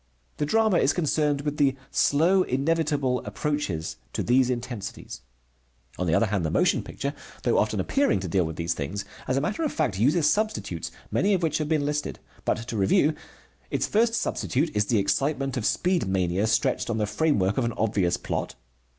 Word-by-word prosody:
The 150 - -1
drama 220 0 +3
is 140 - +3
concerned 150 -3 +1
with 150 0 -3
the 135 -2 +3 0.2
slow, 170 +7 +3
inevitable 145 -3 0
approaches 100 - -3 0.2
to - - -1
these 125 +1 +3
intensities. 120 - -5 0.8
On 90 - -1
the 80 - +3
other 115 - +3
hand, 100 -4 -1
the 80 - 0
motion - - +2
picture, 140 0 -4 0.3
though - - +3
often - - 0
appearing 280 - +1
to 95 - -4
deal 90 +1 +2
with 80 -1 -4
these 85 +1 -1
things, 95 +8 -4 0.2
as 130 - +1
a - - +2
matter 205 - -2
of 310 - 0
fact 120 -12 -1
uses 150 +7 +3
substitutes, 210 - -1 0.2
many 200 +1 +2
of 180 - -2
which 160 -2 +1
have 150 -1 -2
been 155 -3 +1
listed. 150 0 -2 0.3
But - - +1
to 115 - -3
review: 105 +10 +3 0.6
its - - 0
first 225 +2 +2
substitute 150 - -1
is 105 0 +2
the 115 - +2
excitement 135 +6 0
of 120 -5 0
speed 180 - +1
mania 95 +2 +1
stretched 110 +1 +1
on 115 - 0
the 105 - +1
framework 105 -6 +1
of 125 - +1
an 115 - -1
obvious 100 -6 +1
plot. - - -4
135 Hz, 190 wpm, -26 LUFS, 100-155 Hz, 0.8 s, drama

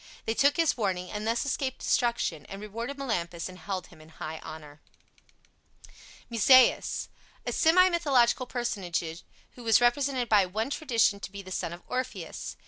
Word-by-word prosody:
They 225 - 0
took 285 +5 +3
his 330 -2 +3
warning, 185 -5 -2
and 210 +1 -4
thus 230 +4 0
escaped 270 -1 -2
destruction, 235 - 0
and 195 - -8
rewarded 230 +6 -6
Melampus 175 -11 -3
and 185 0 -11
held 190 -3 -4
him 155 - -16
in 155 - -16
high 160 0 -7
honor. 150 -1 -10 1.5
MUSAEUS 255 +3 +4 0.4
A - - -2
semi 350 +3 +5
mythological 270 -8 +2
personage 210 -10 -2 0.5
who 245 - -13
was 225 -1 +5
represented 250 +1 +1
by 205 -4 +4
one 220 +8 -3
tradition 230 -9 +1
to 195 - -7
be 200 0 -8
the 185 - -11
son 170 - -3
of 175 +1 -9
Orpheus. 200 - -5
225 Hz, 160 wpm, -28 LUFS, 185-255 Hz, 1.5 s, semi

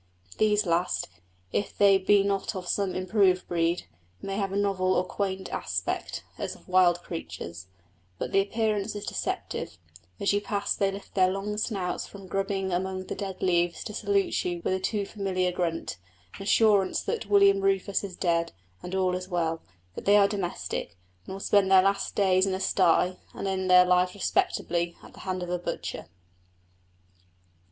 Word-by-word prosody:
These 210 -1 +3
last, 170 +1 0 0.4
if 205 - -2
they 195 -1 +6
be 200 +1 +4
not 200 +1 -1
of 180 -1 -5
some 195 -1 0
improved 185 0 +2
breed, 170 0 0 0.4
may 195 0 -4
have 195 -2 -1
a - - -3
novel 195 -2 +1
or - - +2
quaint 190 0 -3
aspect, - - -3 0.2
as - - -3
of - - -20
wild 180 -1 +4
creatures, 90 - -7 0.5
but - - -4
the 195 - +4
appearance 215 0 -1
is 205 - -5
deceptive; 85 - -4 0.4
as 200 - +2
you 205 - +1
pass 200 -1 -1
they 195 -1 +1
lift 195 +1 -9
their 185 -1 +4
long 195 +2 -3
snouts 200 -4 -2
from 200 -1 -11
grubbing 195 0 -2
among 185 +1 -2
the - - -4
dead 195 -2 -5
leaves 175 -2 +1
to 210 - -6
salute 200 -2 0
you 175 -1 -3
with - - +1
a 190 - 0
too 200 +2 -1
familiar 185 -3 -1
grunt 170 - -2 0.4
an - - -10
assurance 200 -2 +3
that - - -3
William 200 -1 +5
Rufus 195 +1 +1
is 190 -3 -6
dead, 170 -2 0 0.3
and 180 +1 -5
all 185 -1 +1
is 180 +1 -4
well; 165 -2 -1 0.3
that - - -8
they 205 +1 +6
are 200 -1 +6
domestic, 185 - -4 0.3
and 190 - -5
will - - -7
spend 195 -1 +3
their 190 -1 +7
last 195 0 0
days 190 -1 +3
in 190 - 0
a - - -4
stye, 180 -1 +2 0.2
and - - -4
end 190 -1 -1
their 180 0 +8
life 180 +1 +2
respectably 170 -3 0
at - - -14
the - - -14
hands 185 -1 -2
of 175 - -6
the 180 0 -1
butcher. 175 - -5
190 Hz, 180 wpm, -27 LUFS, 180-200 Hz, 0.5 s, their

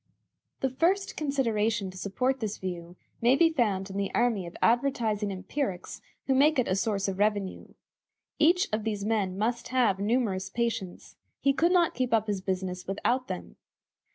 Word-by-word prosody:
The 265 - +1
first 365 +9 +1
consideration 230 -8 0
to - - -15
support 250 +8 -1
this 215 -3 -3
view 175 -2 -6 0.3
may 240 +3 +5
be 330 +2 +4
found 205 -10 0
in 195 - -5
the 200 -1 -1
army 230 -7 +1
of 170 - -10
advertising 230 -4 +1
empirics 190 +1 -4 0.2
who 270 - +2
make 290 +3 +4
it 255 - +2
a 185 - +1
source 200 -1 0
of 195 0 -3
revenue. 205 -2 0 0.7
Each 345 +4 +4
of 215 0 0
these 205 -2 -2
men 205 -4 0
must 235 +3 -1
have 235 -7 +2
numerous 200 -3 0
patients; 225 -4 -3 0.2
he 275 - +3
could 335 +5 +2
not 350 -2 +3
keep 250 -2 +1
up 220 -1 +1
his 205 -3 -2
business 185 -1 -3
without 245 +6 0
them. - - -7
220 Hz, 170 wpm, -28 LUFS, 195-260 Hz, 0.7 s, may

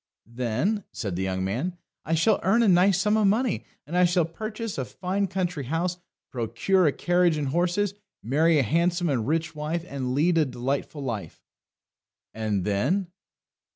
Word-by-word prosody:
"Then," 125 - -1
said 100 -6 -4
the 90 - -2
young 95 0 -1
man, 130 - -2 0.3
"I 165 - +1
shall 205 +7 +3
earn 210 +6 +3
a - - +3
nice 185 +1 +5
sum 210 +2 +2
of 215 -2 +4
money, 220 +2 +1 0.2
and 165 - -6
I 180 - +5
shall 175 -1 +2
purchase 215 - -5
a - - 0
fine 185 - -2
country 180 -6 -2
house, 170 +6 -1 0.3
procure 125 - +1
a - - +4
carriage 175 0 +2
and 145 -3 -1
horses, 180 +6 +1 0.3
marry 155 +7 +3
a 140 - +4
handsome 170 - +1
and 125 -5 0
rich 160 +2 0
wife, 155 +3 -3
and 130 -4 -3
lead 165 +4 +3
a 155 - +4
delightful 135 +3 -3
life!" 115 -6 -5 0.9
"And 105 -4 -1
then?" 160 - 0
165 Hz, 170 wpm, -26 LUFS, 130-185 Hz, 0.9 s, nice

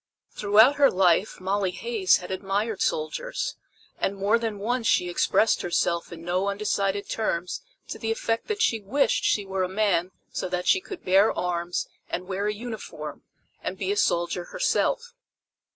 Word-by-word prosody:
Throughout 215 +7 +5
her 280 -1 +6
life 185 +2 +2
Molly 190 +1 0
Hays 410 - +2
had 180 - -8
admired 195 +3 -2
soldiers, - - -2 0.4
and 200 - 0
more 200 +4 +2
than 225 -3 -3
once 230 +3 -1
she 180 - +3
expressed 215 +5 +2
herself 170 -1 0
in 165 -1 -9
no 180 +3 0
undecided 200 -1 -1
terms 180 -5 -2 0.3
to - - -5
the 225 - -3
effect 225 0 -1
that 430 0 0
she 225 - +2
wished 250 +9 +1
she 205 - +2
were 190 0 -2
a 185 - 0
man 190 -3 +1 0.2
so - - -3
that 180 0 -2
she 380 - +4
could 390 -1 -9
bear 195 +3 +5
arms 175 0 -1 0.2
and 180 - -3
wear 195 +2 -2
a 210 - 0
uniform, 225 0 -7 0.4
and - - -4
be 390 - -1
a - - +1
soldier 175 - +1
herself. 485 - 0
200 Hz, 170 wpm, -26 LUFS, 180-225 Hz, 0.4 s, her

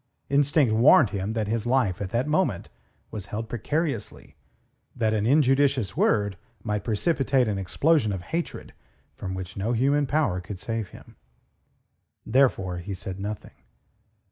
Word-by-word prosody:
Instinct 140 -3 +3
warned 125 - +6
him 100 +1 -3
that 110 -2 -1
his 115 +1 -2
life 115 -8 +1
at 100 - -3
that 120 +5 0
moment 150 - 0 0.4
was 105 -3 -6
held 110 +2 -5
precariously, 140 0 -3 0.6
that 110 -3 +1
an 110 0 0
injudicious 135 -6 +3
word 100 -4 +1 0.2
might 105 -3 -2
precipitate 135 - +1
an 100 -2 -1
explosion 135 - +2
of 95 -3 -4
hatred 165 - -5 0.4
from 95 -1 -5
which 95 0 -7
no 105 +5 -1
human 140 +4 +2
power 140 -11 0
could 95 +2 -7
save 115 +1 -4
him. - - -15 1.1
Therefore 100 -9 +2
he 95 +3 -5
said 95 +1 -6
nothing. 105 +1 -6
110 Hz, 145 wpm, -25 LUFS, 100-135 Hz, 1.1 s, warned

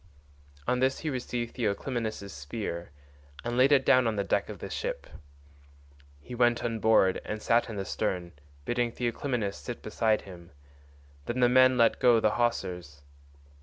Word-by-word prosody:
On 125 - +1
this 130 +1 +2
he 155 - -2
received 120 -2 -4
Theoclymenus' 110 -2 -3
spear 85 +4 -5 0.5
and 120 0 -3
laid 130 +3 +4
it 135 -2 +4
down 130 -2 +5
on 110 - 0
the 100 - 0
deck - - 0
of - - -7
the - - -7
ship. - - -4 1.1
He 125 - -11
went 120 -1 +2
on 115 -1 -2
board 110 -4 +3
and 110 - -4
sat 115 +2 +2
in 110 - -6
the 100 -1 -3
stern, 90 -5 -2 0.3
bidding 120 -1 0
Theoclymenus 120 -3 -2
sit 120 - -7
beside 110 0 +1
him; 85 -4 -13 0.7
then 120 +2 -2
the 125 - +5
men 130 0 +5
let 115 -1 +3
go 120 -2 +5
the 110 - +2
hawsers. 90 -11 -2
115 Hz, 165 wpm, -28 LUFS, 100-125 Hz, 1.1 s, down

